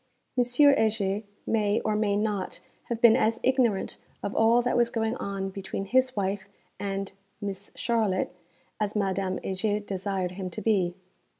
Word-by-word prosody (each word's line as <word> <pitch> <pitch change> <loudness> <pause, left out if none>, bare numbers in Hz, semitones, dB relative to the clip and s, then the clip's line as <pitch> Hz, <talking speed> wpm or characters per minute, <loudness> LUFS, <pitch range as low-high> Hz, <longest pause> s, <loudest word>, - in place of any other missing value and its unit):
M. 250 - +4
Heger 220 -6 +3 0.2
may, 210 -1 +2
or 215 - 0
may 210 -1 +1
not, 205 -2 -1 0.3
have 235 -2 -3
been 235 -2 +8
as 225 +1 +2
ignorant 250 -6 +2 0.3
of 200 - -3
all 230 +2 +5
that 245 - +1
was 240 -1 +4
going 225 -1 -1
on 195 -1 -3
between 195 0 -4
his 255 +4 +2
wife 200 0 -2 0.3
and 195 -1 -3 0.3
'Mees 200 -1 -5
Charlotte' 220 -6 0 0.5
as 210 0 -1
Madame 195 -2 0
Heger 205 +2 0
desired 195 -2 -2
him 185 0 -5
to 215 - -6
be. 185 -6 +2
205 Hz, 155 wpm, -27 LUFS, 195-225 Hz, 0.5 s, been